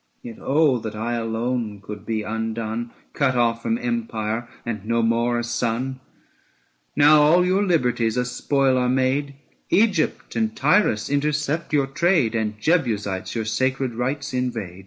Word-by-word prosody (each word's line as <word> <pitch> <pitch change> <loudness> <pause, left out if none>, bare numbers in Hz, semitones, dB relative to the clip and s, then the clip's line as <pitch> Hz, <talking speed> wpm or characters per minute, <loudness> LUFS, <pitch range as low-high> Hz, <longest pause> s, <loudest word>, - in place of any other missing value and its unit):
Yet 115 -2 -8
oh 140 -2 +3
that 110 -1 -6
I 115 +3 -2
alone 115 -1 -2
could 105 +1 -9
be 110 -2 -1
undone, 110 +1 -3 0.2
Cut 135 -3 +1
off 115 -1 +1
from 230 - 0
empire, 120 - -3 0.2
and 110 -4 -4
no 115 +1 0
more 115 +1 +1
a 120 - -1
son! 120 +2 -2 1.0
Now 150 +1 +6
all 170 +5 +5
your 185 +2 +2
liberties 125 - +1
a 125 - +1
spoil 130 +1 +1
are 125 0 +1
made, 135 +2 0 0.3
Egypt 195 -6 +1
and 220 0 0
Tyrus 180 - +2
intercept 150 +2 -1
your 145 -3 +3
trade, 150 -2 +2
705 110 -2 -1
And - - -26
Jebusites 105 - 0
your 110 -1 -2
sacred 130 +3 -1
rites 135 +4 -3
invade. 115 -8 -3
125 Hz, 155 wpm, -23 LUFS, 115-145 Hz, 1.0 s, Now